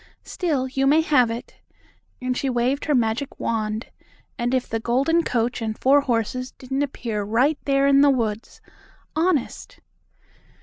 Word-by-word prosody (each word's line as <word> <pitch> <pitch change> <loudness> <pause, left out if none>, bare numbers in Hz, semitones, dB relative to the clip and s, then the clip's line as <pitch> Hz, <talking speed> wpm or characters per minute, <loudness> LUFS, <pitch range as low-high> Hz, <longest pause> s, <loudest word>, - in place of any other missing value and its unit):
Still, 295 -8 -1
you 270 +1 0
may 305 +3 +5
have 275 -7 +3
it," 230 +2 -7 0.6
and 255 0 -2
she 270 - -1
waved 255 +3 0
her 295 - +2
magic 235 +3 -1
wand, 215 0 -2 0.4
and 240 0 -2
if 255 -1 0
the 225 - -2
golden 270 +9 +2
coach 240 -2 -1
and 220 -1 -3
four 280 +2 +4
horses 255 0 -1
didn't 265 +2 -4
appear 235 -6 -3
right 245 +9 +1
there 275 0 +2
in 280 0 +5
the 285 - +6
woods 225 -5 -2 0.5
honest! 320 -5 -1
255 Hz, 155 wpm, -23 LUFS, 230-280 Hz, 0.6 s, the